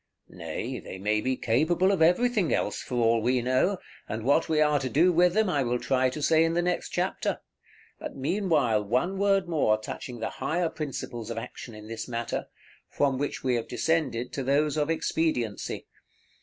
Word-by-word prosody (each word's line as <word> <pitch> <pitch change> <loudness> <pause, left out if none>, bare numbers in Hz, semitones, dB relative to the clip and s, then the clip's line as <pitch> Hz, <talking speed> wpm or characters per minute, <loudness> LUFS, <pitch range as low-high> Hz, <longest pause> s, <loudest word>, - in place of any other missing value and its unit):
Nay, 90 +9 -5
they - - -8
may 105 +2 0
be 130 +1 -1
capable 160 - +2
of 190 -5 0
everything 195 +2 +3
else, - - 0
for 125 - -5
all 115 -1 +3
we 125 +3 +2
know, 130 +11 +1 0.3
and 110 +1 -4
what 140 +7 +2
we 155 -1 +2
are 150 -1 +3
to 130 - -3
do 170 +7 +4
with 175 +2 +4
them 220 -1 +3
I 145 -6 +1
will 125 -1 0
try 130 +1 +1
to 145 +3 -5
say 160 +1 +4
in 165 0 +1
the 175 - +2
next 180 0 -1
chapter; - - -1 0.6
but - - -7
meanwhile 140 - +1
one 130 - 0
word 195 -2 +2
more 145 -10 +2
touching 120 +2 -7
the 110 - -3
higher 165 +5 -1
principles 125 -7 -5
of 115 - -4
action 115 0 -7
in 105 0 -11
this 110 0 -5
matter, 120 -1 -3 0.4
from 135 -2 0
which 145 - -3
we 130 -1 +1
have 115 - -4
descended 125 -2 -1
to 140 - -2
those 145 +3 +2
of 150 0 0
expediency. 155 -9 -1
135 Hz, 190 wpm, -27 LUFS, 120-165 Hz, 0.6 s, do